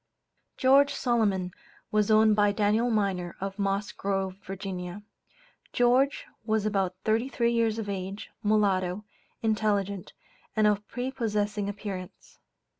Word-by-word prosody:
George 280 +2 +5
Solomon 205 -7 +1 0.4
was 210 0 +2
owned 215 0 +5
by 205 -1 +4
Daniel 215 +3 +2
Minor, 195 -5 0
of 195 +1 -5
Moss 200 0 0
Grove, 195 -1 -2
Va. 190 0 -6 0.7
George 255 +3 +3 0.2
was 220 -1 0
about 195 -3 0
thirty 225 +4 +1
three 235 -3 +1
years 225 -2 +1
of 220 -2 -4
age; 195 +1 -5
mulatto, 205 -2 +1 0.4
intelligent, 205 -3 0 0.4
and 215 -1 +3
of 210 0 +2
prepossessing 210 -5 -2
appearance. 195 -3 -7
210 Hz, 115 wpm, -28 LUFS, 195-220 Hz, 0.7 s, George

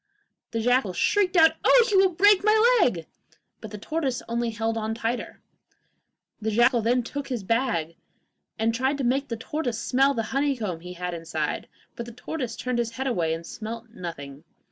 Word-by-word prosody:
The 230 - -3
jackal 245 -4 +2
shrieked 375 - +2
out: 320 -1 +7
'Oh, - - +6
you 390 - +5
will 385 0 +5
break 395 +3 +4
my 440 +3 +5
leg!' 170 - +1 0.5
but 220 - -8
the 210 - -7
tortoise 270 +2 -2
only 235 0 -1
held 225 0 -2
on 220 0 -2
the - - -12
tighter. 235 +2 -3 1.0
The 220 - -1
jackal 240 +2 +3
then 245 +3 +1
took 280 +4 -5
his 245 -6 -3
bag 190 -8 0 0.6
and 225 0 +1
tried 260 +4 0
to 275 - -3
make 270 +3 +1
the 230 - -4
tortoise 245 -1 -3
smell 270 +3 +2
the 225 - -1
honeycomb 260 - -1
he 180 +2 -9
had 180 0 -4
inside; 160 -2 -3 0.3
but 235 - -6
the 235 - -9
tortoise 250 -1 -5
turned 250 0 -2
away - - +4
his - - -8
head 265 +2 -3
and 165 -8 -1
smelt 225 +4 -7
nothing. 150 -7 -8
235 Hz, 190 wpm, -25 LUFS, 215-275 Hz, 1.0 s, out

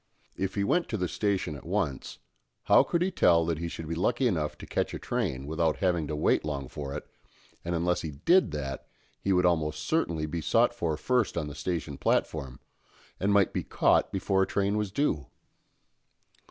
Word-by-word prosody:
If 95 0 -3
he 100 - +1
went 175 - +1
to 110 - -1
the 90 -2 -1
station 95 -4 -1
at 70 - -10
once, 65 -2 -2 0.5
how - - +6
could 170 0 0
he 190 - 0
tell 85 - +4
that 80 -2 -1
he 85 - -3
should 85 -1 -6
be 85 - -2
lucky 120 +10 +1
enough 80 -8 -1
to - - -9
catch - - -2
a - - -3
train 65 +1 -2
without 80 +1 0
having 85 -5 +1
to 75 - -3
wait 75 - +2
long 70 -3 -3
for 70 +1 -6
it, 75 - -6 0.6
and 85 0 -2
unless 90 +1 +1
he 80 - -4
did 110 - +3
that, 70 -3 -5 0.3
he 100 - 0
would 90 -1 +3
almost 80 -3 +1
certainly 85 - 0
be 80 +2 -4
sought 115 - +3
for 85 -10 -2
first 125 +3 0
on 80 - -1
the - - -7
station 75 -1 -4
platform, 70 -4 -1 0.6
and 100 +2 +1
might 100 -2 +3
be - - -1
caught - - +2
before 95 0 +1
a 95 - +2
train 100 0 0
was 105 -2 -1
due? 95 - 0
85 Hz, 200 wpm, -28 LUFS, 75-100 Hz, 0.6 s, how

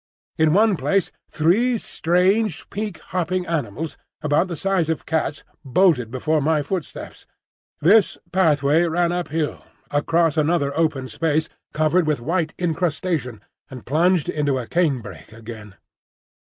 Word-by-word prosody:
In 160 -1 +4
one 210 -2 +4
place 155 +7 0 0.2
three 220 +11 +2
strange, 185 0 +1
pink, 210 -3 -4 0.2
hopping 180 0 -1
animals, 160 - -3 0.2
about 150 +4 +2
the 175 - -4
size 185 -2 0
of 160 - -2
cats, 155 -2 -2 0.2
bolted 135 - +2
before 150 +5 0
my 150 0 +1
footsteps. 175 +2 -6 0.5
This 200 +6 +4
pathway 155 -4 +3
ran 170 +1 +1
up 175 0 -2
hill, 155 0 -3 0.3
across 165 +2 +1
another 150 -2 +1
open 155 -5 0
space 160 +2 0 0.2
covered 155 +2 +2
with 150 -4 +1
white 160 +5 -1
incrustation, 160 - -2 0.3
and 130 -3 -10
plunged 165 +4 +2
into 145 -3 0
a 125 - -4
canebrake 115 - -2
again. 110 -3 -10
160 Hz, 130 wpm, -22 LUFS, 145-180 Hz, 0.5 s, In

